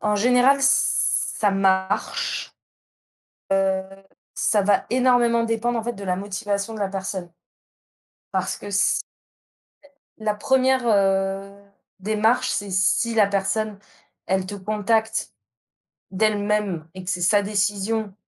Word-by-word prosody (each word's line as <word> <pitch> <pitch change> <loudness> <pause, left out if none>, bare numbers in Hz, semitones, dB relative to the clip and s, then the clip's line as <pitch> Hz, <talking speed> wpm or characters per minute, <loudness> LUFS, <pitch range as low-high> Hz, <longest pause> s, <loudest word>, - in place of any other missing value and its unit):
en 210 -1 +1
général, 250 +5 +4
ç 270 0 +3 0.5
ça 205 - +4
marche, 195 +1 0 1.0
heu, 190 -1 +2 0.5
ça 210 -2 +1
va 200 0 +2
énormément 245 -2 +3
dépendre 230 +1 -1
en 225 - -4
fait 240 - -2
de 200 - -10
la 180 -1 -1
motivation 200 +2 -3
de 215 - -7
la 200 - 0
personne 190 -2 -5 1.0
parce - - -1
que 205 - -9
c'est 195 - +2 1.2
la 215 -1 -1
1re, 260 +2 +1
heu, 195 -1 +1 0.5
démarche, 215 +4 +1
c'est 205 -1 -2
si 195 +5 +1
la 210 -3 +5
personne, 200 +2 -1 0.5
elle 190 0 0
te 205 - -6
contacte 215 - -1 0.8
d'elle-même 205 -4 0
et 185 - -9
que 180 - -3
c'est 180 -2 -2
sa 205 +3 +3
décision 205 +1 -1
205 Hz, 125 wpm, -23 LUFS, 195-225 Hz, 1.2 s, la